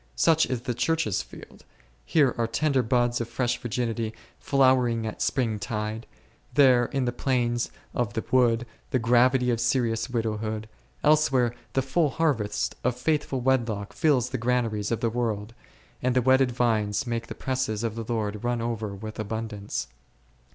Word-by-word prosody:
Such 160 -1 +4
is 125 -3 -2
the 125 - -2
Church's 125 - 0
field; 65 - -13 0.4
here 145 -6 +3
are 115 -1 0
tender 135 +4 +1
buds 120 0 +1
of 115 - -4
fresh 120 +1 -1
virginity 115 -1 -2 0.2
flowering 130 -4 +3
at 110 - -5
spring 115 -5 0
tide, 110 +1 -4 0.5
there 130 -4 +6
in 135 +1 -1
the 120 - 0
plains 120 -2 0 0.2
of 115 -4 -1
the 110 - -2
wood 120 -2 +3 0.2
the - - +1
gravity 125 +2 +3
of 115 -1 -1
serious 120 -2 +1
widowhood, 110 -2 -2 0.4
elsewhere 135 -6 +3 0.2
the 135 - +1
full 150 +4 +1
harvest 115 -9 0
of 125 -1 +1
faithful 140 -1 0
wedlock 115 -6 0
fills 140 -7 +2
the 130 - -2
granaries 115 -3 0
of 115 - -1
the 115 - +2
world, 115 -2 -2 0.5
and 130 0 +1
the 125 - +4
wedded 130 0 +4
vines 115 -1 +1
make 115 -1 -3
the - - -7
presses 130 -5 -2
of 115 -2 -1
the 115 +1 -5
Lord 105 -2 -2
run 120 0 0
over 110 -3 -3
with 110 +2 -8
abundance. 110 -1 -4
120 Hz, 160 wpm, -26 LUFS, 110-130 Hz, 0.5 s, there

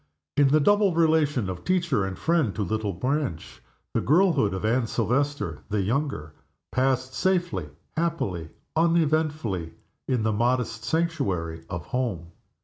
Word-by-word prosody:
In 145 -1 +5
the 150 +3 +4
double 205 +2 +3
relation 155 - +3
of 90 -1 -5
teacher 175 - +1
and 95 -1 -5
friend 160 - +1
to 105 - -1
little 110 +1 -1
Blanche, 125 - -3 0.3
the - - +1
girlhood 165 - +3
of 95 +2 -3
Anne 115 +2 +2
Silvester 140 +7 -1
the 105 -1 0
younger 110 - -2 0.4
passed 130 0 +1
safely, 175 - 0 0.3
happily, 135 - -1 0.3
uneventfully, 155 - +1 0.3
in 125 -4 +1
the 110 0 +1
modest 120 0 0
sanctuary 95 - -1
of 85 -5 -5
home. 100 -10 -3
125 Hz, 135 wpm, -26 LUFS, 100-155 Hz, 0.4 s, In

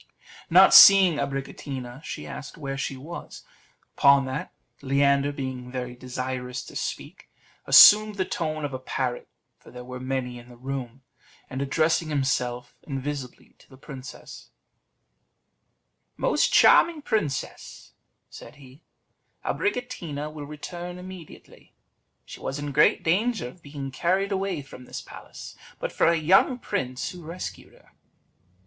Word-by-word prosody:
Not - - +7
seeing 190 -5 +9
Abricotina, 135 -1 -5
she - - -7
asked 140 +1 -9
where 135 -3 -5
she 135 -1 -4
was. 160 +6 -9 0.5
Upon 140 -1 +5
that, 130 0 -5 0.3
Leander, 140 +1 +2
being 130 -3 -6
very 125 -1 -5
desirous 125 0 -5
to - - -13
speak, - - -6 0.4
assumed 215 0 +8
the 190 -2 -1
tone 155 -3 -3
of 140 - -5
a 130 - -4
parrot, 130 -1 -3 0.3
for - - -17
there 125 0 -10
were 125 0 -8
many 130 -1 -4
in 120 +1 -15
the 120 - -14
room; 130 0 -6 0.5
and 130 +1 -4
addressing 155 +3 +1
himself 125 -4 -1
invisibly 135 -2 -6
to - - -22
the 130 - -16
princess, 130 -1 -11 1.7
"Most - - +1
charming 330 -3 +5
princess," 150 - -4 0.3
said - - -13
he, 135 +1 -16 0.6
"Abricotina 170 - -3
will 145 -2 -8
return 175 +4 -7
immediately. 180 -3 -13 0.5
She - - -11
was 135 - -4
in 145 0 -5
great 150 +2 +3
danger 205 - 0
of 175 - -17
being 140 -2 -7
carried 190 +8 0
away 190 -5 -2
from 125 -1 -13
this - - -7
palace, - - -11 0.2
but - - -4
for - - +2
a 170 - +4
young 185 - +3
prince 130 - -3
who 180 - -11
rescued 170 +3 -8
her." - - -23
140 Hz, 135 wpm, -25 LUFS, 130-170 Hz, 1.7 s, seeing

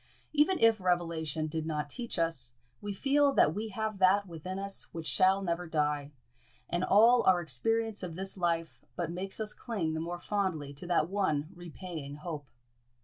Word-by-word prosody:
Even 305 +5 +4
if 225 -5 +4
revelation 165 -4 0
did 160 +1 -3
not 150 -2 -2
teach 235 - -4
us, 165 -8 0 0.3
we 205 - -4
feel 280 +7 +3
that 150 - +4
we 215 +4 -3
have 215 0 -3
that 195 +2 +5
within 180 +1 -6
us 195 0 -3
which 165 -1 -6
shall 190 +3 +3
never 175 -1 -2
die; 150 -2 0 0.6
and 175 +1 -1
all 230 +6 +6
our 185 -2 +6
experience 215 - 0
of 175 -3 -5
this 190 +2 -4
life 170 -3 -1
but 170 -2 -2
makes 190 +4 -4
us 215 -1 -3
cling 190 -10 -3
the 160 - -2
more 170 +2 -3
fondly 175 -8 -2
to 145 +5 -9
that 170 -3 +2
one 170 -6 0
repaying 170 -4 -7
hope. 150 -2 -6
175 Hz, 175 wpm, -31 LUFS, 160-200 Hz, 0.6 s, all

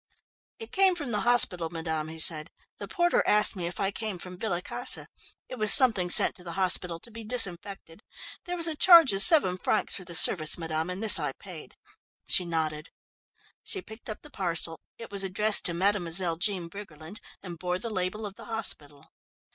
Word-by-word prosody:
"It 450 - -12
came 385 -1 +2
from 290 -8 -6
the 210 - -2
hospital, 190 -9 +1
madame," 160 -2 -5
he 160 +1 -10
said. 160 0 +1 0.3
"The - - -8
porter 350 0 0
asked 210 +1 +3
me 175 -3 -5
if 175 - -8
I 195 0 -1
came 215 -2 -6
from 180 +1 -8
Villa 190 -6 -3
Casa. - - -1 0.4
It 255 - -10
was 215 -1 +5
something 220 -10 +3
sent - - +6
to 180 - -11
the 170 -1 -8
hospital 180 -2 0
to 235 - -11
be 225 +1 -10
disinfected. 200 -5 -2 0.4
There 355 0 -5
was 335 - -1
a 325 -2 -1
charge 330 - +6
of 195 - +2
seven 195 - +3
francs - - -1
for 185 - -9
the 170 -1 -7
service, 155 -2 +6
madame, 160 0 -5
and 185 +4 -6
this 220 - +8
I - - -4
paid." - - -13 0.5
She 180 - +1
nodded. 155 -2 -4 0.7
She 385 -3 -6
picked 220 +1 -13
up 215 - -8
the 300 - -15
parcel 170 - -1 0.2
it 230 - -11
was 200 -1 -2
addressed 205 +3 -1
to 175 - +5
"Mademoiselle 175 -3 -1
Jean 185 -1 -3
Briggerland" 170 -1 -12 0.2
and 175 -4 -10
bore 180 0 -3
the 225 +5 -7
label 190 +2 -4
of 200 - -8
the - - -15
hospital. 150 -11 -5
190 Hz, 195 wpm, -26 LUFS, 170-220 Hz, 0.7 s, this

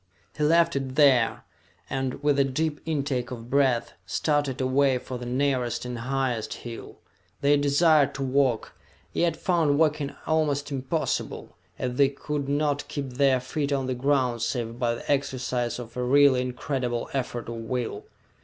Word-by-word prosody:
He 150 - -1
left 165 +1 +4
it 135 -1 -3
there 135 -6 +4 0.4
and, 135 +1 -3
with 145 -1 +3
a - - +6
deep 150 +3 -2
intake 140 -5 -1
of 120 -1 -8
breath, 135 -4 +2
started 145 -4 0
away 130 0 +3
for 125 0 -6
the 120 - -6
nearest 125 -2 0
and 125 -1 -5
highest 125 -2 -2
hill. 115 -1 -8 0.4
They 145 +1 +4
desired 145 0 +3
to 135 - -3
walk, 130 -3 +1 0.4
yet 170 -2 +1
found 165 -5 +2
walking 150 -2 +1
almost 150 -2 0
impossible, 140 +4 -3 0.2
as 125 -1 -3
they 140 -1 +5
could 140 0 -4
not 145 0 0
keep 140 -3 -5
their 135 0 +3
feet 140 +3 -3
on 135 -2 0
the 130 - -1
ground 125 -2 +1
save 115 0 -2
by 120 -1 +1
the 120 - -4
exercise 130 -3 -1
of 115 -2 -9
a 125 - -2
really 135 0 +5
incredible 125 -1 -2
effort 125 -3 -3
of 115 0 -5
will. 115 +1 -4
135 Hz, 160 wpm, -26 LUFS, 125-145 Hz, 0.4 s, a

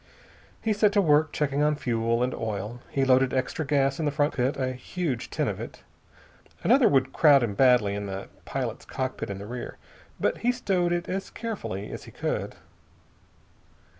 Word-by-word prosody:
He 220 - +2
set 205 0 +3
to 205 - +4
work 155 -3 +4
checking 145 -1 0
on 150 0 +3
fuel 115 -3 0
and 125 - -1
oil. 110 +2 -4
He 135 -1 +1
loaded 130 0 +4
extra 130 +4 -1
gas 140 -1 +1
in 160 - 0
the - - +3
front 145 +1 +1
cockpit, 130 +3 0
a 130 -1 0
huge 130 0 -3
tin - - -1
of - - -3
it. - - -8 0.8
Another - - +5
would 135 -1 +2
crowd 145 -5 +6
him 110 -4 -1
badly 120 -3 +4
in 100 0 -4
the 95 0 -5 0.2
pilot's - - -4
cockpit 130 -4 -4
in 100 - -4
the 100 - -7
rear, 120 +3 -6 0.4
but - - 0
he 245 - +2
stowed 190 -8 0
it 175 0 -1
as 190 +1 -3
carefully 200 - -5
as - - -7
he - - -12
could. - - -3
135 Hz, 185 wpm, -27 LUFS, 120-155 Hz, 0.8 s, crowd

